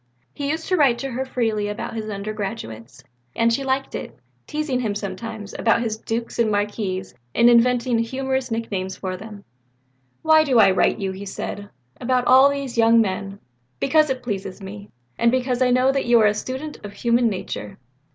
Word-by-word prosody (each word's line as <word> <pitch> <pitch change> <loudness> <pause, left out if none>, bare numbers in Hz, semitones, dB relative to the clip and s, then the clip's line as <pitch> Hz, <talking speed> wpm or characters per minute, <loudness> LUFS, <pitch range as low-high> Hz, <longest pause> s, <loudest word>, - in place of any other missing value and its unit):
He 280 -1 -3
used 320 +2 -2
to 370 - +3
write 275 -8 +4
to 270 +1 -4
her 260 +2 -2
very 260 - -18
freely 220 -4 0
about 205 0 -5
his 220 -1 -4
undergraduates; 200 - -6 0.3
and 230 0 +3
she 275 - -1
liked 270 0 -1
it - - -6 0.3
teasing 300 -4 -1
him 215 -5 -1
sometimes 205 +1 -6
about 235 +1 +3
his 220 -2 -1
dukes 230 +2 -4
and 230 -2 +3
marquises 205 -2 -2 0.2
and 235 +1 +6
inventing 240 0 +3
humorous 265 +2 -2
nicknames 200 -5 -3
for 185 -1 -4
them. 205 +1 -10 0.8
"Why 315 0 +6
do 265 -5 +2
I 210 - +7
write 185 - +2
to - - -6
you," 190 - -1
he 195 +1 -8
said, 200 +1 -6 0.3
"about 250 0 0
all 265 +2 +7
these 275 -4 -3
young 230 0 +6
men? 195 -1 -1 0.4
Because 305 +1 +3
it 255 -1 -2
pleases 195 -4 -4
me, 200 +1 -9 0.3
and 235 - +4
because 255 0 0
I 255 - +4
know 255 +2 +4
that 275 -2 -1
you 240 -1 +6
are - - +5
a 210 - +4
student 260 +7 -6
of 205 -1 -8
human 235 +3 +2
nature." 185 - -5
230 Hz, 190 wpm, -22 LUFS, 205-260 Hz, 0.8 s, I